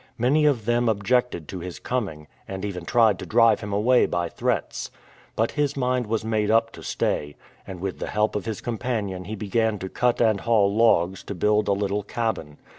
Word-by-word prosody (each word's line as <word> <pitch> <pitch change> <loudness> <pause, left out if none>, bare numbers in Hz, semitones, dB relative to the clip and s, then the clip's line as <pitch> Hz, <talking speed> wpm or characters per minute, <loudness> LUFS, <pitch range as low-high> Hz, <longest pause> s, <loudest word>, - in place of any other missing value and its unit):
Many 140 +6 +3
of 125 -7 +1
them 120 0 +2
objected 110 -4 0
to 95 - -5
his 90 0 -7
coming, 95 -12 -3 0.2
and 95 +1 -5
even 90 -4 -5
tried 110 -1 +3
to - - -6
drive 115 0 +4
him 105 -1 -6
away 115 +5 +3
by 85 -1 -1
threats. - - -2 0.5
But 115 +1 +1
his 145 -1 -1
mind 125 -2 0
was 110 0 -1
made 110 -2 0
up 115 +1 +3
to - - -12
stay, 75 0 -2 0.3
and 95 -2 -7
with 95 0 -4
the - - -4
help 105 0 0
of 105 - -2
his 110 -2 -4
com 120 -2 -4
panion 100 -7 -3
he 110 - -4
began 110 +2 0
to 95 -1 -6
cut 125 +3 +1
and 110 -4 +3
haul 105 -3 +2
logs 95 -5 +3
to 100 - -5
build 105 +4 +2
a 100 - +3
little 100 +1 -1
cabin. 105 -9 -3
105 Hz, 205 wpm, -24 LUFS, 95-115 Hz, 0.5 s, drive